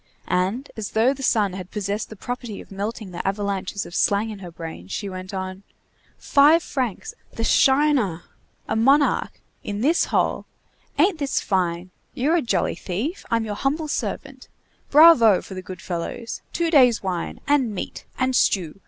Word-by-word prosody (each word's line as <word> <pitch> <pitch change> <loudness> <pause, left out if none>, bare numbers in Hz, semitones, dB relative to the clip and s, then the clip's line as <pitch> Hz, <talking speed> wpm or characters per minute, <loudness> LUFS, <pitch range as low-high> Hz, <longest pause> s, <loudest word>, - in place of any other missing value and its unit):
And, 190 +9 -1
as 220 -2 -6
though 235 +5 +3
the 275 - -10
sun 210 -7 +2
had 185 -1 -7
possessed 205 +1 -3
the 220 - -9
property 240 -1 -6
of - - -13
melting 205 0 -5
the 175 - -4
avalanches 200 0 -2
of - - -11
slang 205 +4 +1
in 210 - -8
her 180 -2 -8
brain, 165 - -8
she 110 - -4
went 185 -1 -7
on:— 190 -1 -5 0.6
"Five 305 +4 +5
francs! 265 - -3 0.2
the - - -4
shiner! 265 - +3 0.4
a - - -1
monarch! 275 +6 +2 0.2
in 205 0 -4
this 315 +8 +3
hole! - - 0 0.5
Ain't 365 -3 +3
this 280 -2 0
fine! 180 -2 -1 0.2
You're 295 +6 +2
a - - +1
jolly 240 - 0
thief! 230 - -4
I'm 230 -1 +1
your 210 - -3
humble 290 +8 -1
servant! - - -4 0.4
Bravo 285 - +7
for - - -10
the 185 - -6
good 185 -1 -9
fellows! 185 +7 -5
Two 335 -1 -1
days' 250 -8 +5
wine! 180 -3 -3
and 265 -7 +2
meat! - - -6
and 260 0 +1
stew! 185 -5 +1
215 Hz, 170 wpm, -23 LUFS, 190-270 Hz, 0.6 s, Bravo